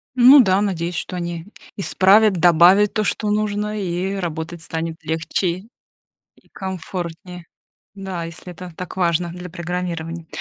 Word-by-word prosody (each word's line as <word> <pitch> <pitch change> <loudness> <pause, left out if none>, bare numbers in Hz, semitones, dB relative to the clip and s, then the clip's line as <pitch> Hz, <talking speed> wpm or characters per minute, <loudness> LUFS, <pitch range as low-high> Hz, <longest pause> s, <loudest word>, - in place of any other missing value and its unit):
Ну 260 +3 +8
да, 190 -1 +3
надеюсь, 175 -3 -2
что 180 - -4
они 170 -1 -4 0.3
исправят, 200 +3 +4
добавят 180 +4 +5
то, 215 - 0
что 210 0 -1
нужно, 210 0 -1
и 185 +2 -2
работать 170 -2 -4
станет 165 0 -4
легче 170 +3 -2 0.7
и - - -28
комфортнее. 180 -2 -6 0.5
Да, 190 -3 -5
если 170 +2 -9
это 180 +1 -9
так 180 - -7
важно 175 -1 +1
для 180 +1 -8
программирования. 170 -1 -5
180 Hz, 135 wpm, -21 LUFS, 170-195 Hz, 0.7 s, Ну